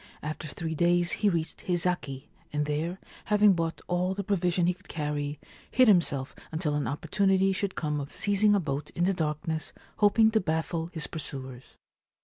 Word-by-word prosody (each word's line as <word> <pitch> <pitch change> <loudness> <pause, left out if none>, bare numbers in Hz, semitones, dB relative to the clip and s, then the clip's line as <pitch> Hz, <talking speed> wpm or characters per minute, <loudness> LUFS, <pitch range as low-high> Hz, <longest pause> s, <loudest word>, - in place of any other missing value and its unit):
After 155 +1 -4
three 160 +2 -4
days 175 +2 +2
he 210 - +2
reached 165 -3 -2
Hizaki, 175 -6 -1 0.2
and 150 0 0
there, 155 +5 -2 0.3
having 210 -1 +5
bought 165 -2 -2
all 180 +1 0
the 200 - -3
provision 180 -3 +1
he 180 - +3
could 190 +3 -22
carry, 150 -2 -3 0.3
hid 255 -1 +5
himself 160 -9 +3 0.2
until 160 -1 -1
an 145 -1 0
opportunity 190 +6 +2
should 195 0 -2
come 150 -2 -1
of 140 +1 -6
seizing 205 +1 +3
a - - +3
boat 145 -3 -3
in 175 - +1
the 190 +2 +3
darkness, 160 -1 -2 0.2
hoping 220 +1 +5
to 220 - +3
baffle 160 0 -1
his 165 -3 -4
pursuers. 130 -5 -7
170 Hz, 170 wpm, -28 LUFS, 150-190 Hz, 0.3 s, having